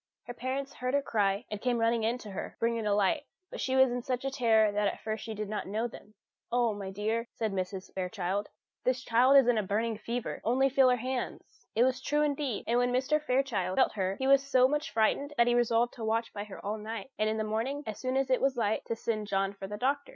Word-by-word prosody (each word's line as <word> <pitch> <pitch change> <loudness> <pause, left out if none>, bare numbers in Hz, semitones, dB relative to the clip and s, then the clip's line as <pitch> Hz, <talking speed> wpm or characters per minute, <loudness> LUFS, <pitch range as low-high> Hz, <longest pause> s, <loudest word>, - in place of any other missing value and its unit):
Her 245 - -6
parents 265 +3 -4
heard 255 +2 -2
her 285 - +3
cry, 205 -2 0
and 210 0 -4
came 250 -1 +1
running 230 0 +2
in 230 +3 +1
to 215 -4 -10
her, 190 - -6
bringing 230 -1 0
a 205 - +3
light; 245 +9 +1 0.2
but - - -5
she 260 - 0
was 265 -1 +5
in 245 0 -2
such 255 +1 -3
a 270 - -1
terror 225 -5 +3
that 205 0 +1
at - - -3
first 220 0 -4
she 220 -1 -5
did 210 0 -4
not 210 +1 -4
know 220 +4 -1
them. 215 -2 -14 0.4
"Oh, 240 -2 +2
my 200 -2 -6
dear," 220 +4 -2
said 220 -3 -2
Mrs. 185 0 -4
Fairchild, 190 +1 -2 0.3
"this 255 0 0
child 250 +4 +5
is 270 -3 +6
in 240 -3 +3
a - - +2
burning 215 +2 -1
fever! 235 +2 -4
Only 260 +4 +3
feel 265 -1 +5
her 250 - +4
hands!" 255 - -5
It 230 - +5
was 255 0 +1
true, 295 +1 +1
indeed; 285 -6 -1
and 240 +1 +2
when 245 0 +2
Mr. 265 +5 +1
Fairchild 250 -10 0
felt 260 - +4
her, 190 -2 -1
he 265 - -3
was 275 0 +6
so 260 -2 +4
much 295 +3 -1
frightened 280 +6 +1
that 235 - +5
he 240 - +2
resolved 240 0 +2
to 230 - -8
watch 225 +1 -1
by 205 0 -5
her 205 - -10
all 210 +2 -2
night, 220 +3 -6
and 215 0 +2
in 220 - -1
the 220 - 0
morning, 230 +7 -2
as 215 - -5
soon 255 0 -1
as 270 -1 0
it 255 - +3
was 270 -1 +1
light, 220 -2 0
to 230 - -2
send 215 -2 -2
John 195 0 0
for 195 -1 -7
the 210 +1 -5
doctor. 275 +4 0
230 Hz, 255 wpm, -30 LUFS, 210-260 Hz, 0.4 s, is